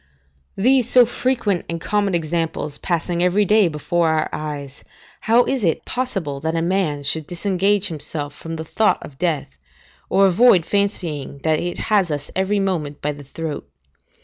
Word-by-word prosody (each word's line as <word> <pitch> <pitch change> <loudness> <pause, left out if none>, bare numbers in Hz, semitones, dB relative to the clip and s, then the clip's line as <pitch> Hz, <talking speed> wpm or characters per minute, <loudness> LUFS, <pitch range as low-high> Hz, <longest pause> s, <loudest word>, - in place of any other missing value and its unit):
These 250 +3 +3
so 250 -1 +7
frequent 235 -6 0
and 170 0 -3
common 200 +1 0
examples 160 -2 -2
passing 170 0 -1
every 180 +4 +3
day 210 0 +4
before 165 +2 0
our 160 -1 +1
eyes, 145 -3 -6 0.4
how 230 +2 +4
is 265 -4 -1
it 165 -4 0
possible 195 - -3
a 160 +1 0
man 170 -4 0
should 150 +2 -1
disengage 195 +2 +1
himself 150 -2 -5
from 165 +2 -7
the 160 0 -5
thought 215 +6 +2
of 135 -2 -12
death, 145 - -2 0.5
or 195 - +4
avoid 190 -2 +5
fancying 180 -9 -2
that 155 -1 +2
it 175 0 -3 0.2
has 195 -4 +4
us 145 -2 -4
every 190 +2 +1
moment 160 -7 -2
by 150 - -1
the 145 0 -10
throat? 150 - -6
170 Hz, 160 wpm, -21 LUFS, 150-200 Hz, 0.5 s, so